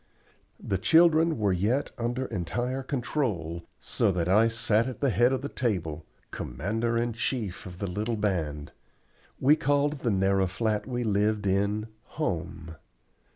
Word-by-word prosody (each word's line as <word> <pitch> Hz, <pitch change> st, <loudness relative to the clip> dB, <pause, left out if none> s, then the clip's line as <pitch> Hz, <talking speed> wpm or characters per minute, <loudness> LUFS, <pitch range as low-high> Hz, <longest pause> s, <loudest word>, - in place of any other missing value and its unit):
The 95 Hz, -, -2 dB
children 165 Hz, -, +5 dB
were 105 Hz, -3 st, +2 dB
yet 110 Hz, +10 st, 0 dB
under 120 Hz, +1 st, -2 dB
entire 120 Hz, +6 st, -2 dB
control, 120 Hz, -, -2 dB
so -, -, +1 dB
that 90 Hz, -2 st, -1 dB
I 105 Hz, +5 st, +5 dB
sat 115 Hz, 0 st, +1 dB
at 130 Hz, -4 st, -6 dB
the 140 Hz, -3 st, +2 dB
head 120 Hz, +5 st, +4 dB
of 130 Hz, 0 st, -1 dB
the -, -, -1 dB
table, 85 Hz, -, -2 dB, 0.2 s
commander 115 Hz, +4 st, -2 dB
in 120 Hz, 0 st, 0 dB
chief 110 Hz, -5 st, -3 dB
of 90 Hz, -1 st, -9 dB
the 100 Hz, -, -3 dB
little 105 Hz, +5 st, -2 dB
band. 80 Hz, -8 st, -2 dB, 0.7 s
We 145 Hz, +3 st, +5 dB
called 145 Hz, -2 st, +1 dB
the 125 Hz, -, -1 dB
narrow 95 Hz, -1 st, +2 dB
flat 105 Hz, +4 st, -1 dB
we 125 Hz, -1 st, -2 dB
lived 105 Hz, -1 st, +1 dB
in 100 Hz, +2 st, +1 dB, 0.3 s
"home." 85 Hz, -, -3 dB
110 Hz, 150 wpm, -28 LUFS, 95-125 Hz, 0.7 s, children